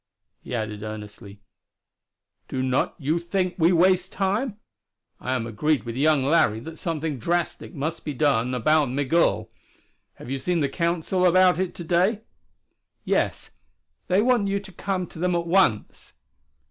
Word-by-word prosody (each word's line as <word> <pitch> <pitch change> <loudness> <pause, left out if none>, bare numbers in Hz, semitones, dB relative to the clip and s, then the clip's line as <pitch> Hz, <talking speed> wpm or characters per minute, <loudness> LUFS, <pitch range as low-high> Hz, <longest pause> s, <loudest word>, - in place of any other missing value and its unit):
He 125 - -6
added 110 -2 -4
earnestly, 105 -1 -9 1.1
"Do 130 - -3
not 130 0 0
you 155 +3 0
think 180 +1 -1
we 165 +2 +5
waste 185 +1 +3
time? 205 +4 -1 0.6
I 130 - -2
am 125 -3 -1
agreed 135 +7 0
with 115 -1 -6
young 145 0 +3
Larry 140 -8 +3
that 160 +4 -9
something 160 -4 -3
drastic 175 +6 -2
must 155 +3 -3
be 150 - -4
done 125 -3 +1
about 150 +3 +2
Migul. 145 +6 +1 0.6
Have - - -12
you 135 - -2
seen 175 +5 0
the 140 -3 +1
Council 170 +3 -1
about 185 0 +5
it 185 -2 -2
to 175 - -7
day?" 185 +6 +1 0.8
"Yes. - - -1 0.6
They 190 +3 +3
want 240 -4 +2
you 200 0 0
to 195 -1 -12
come 185 0 -3
to 160 - -13
them 180 +1 +1
at 170 0 -1
once." 170 - +1
165 Hz, 155 wpm, -24 LUFS, 130-180 Hz, 1.1 s, we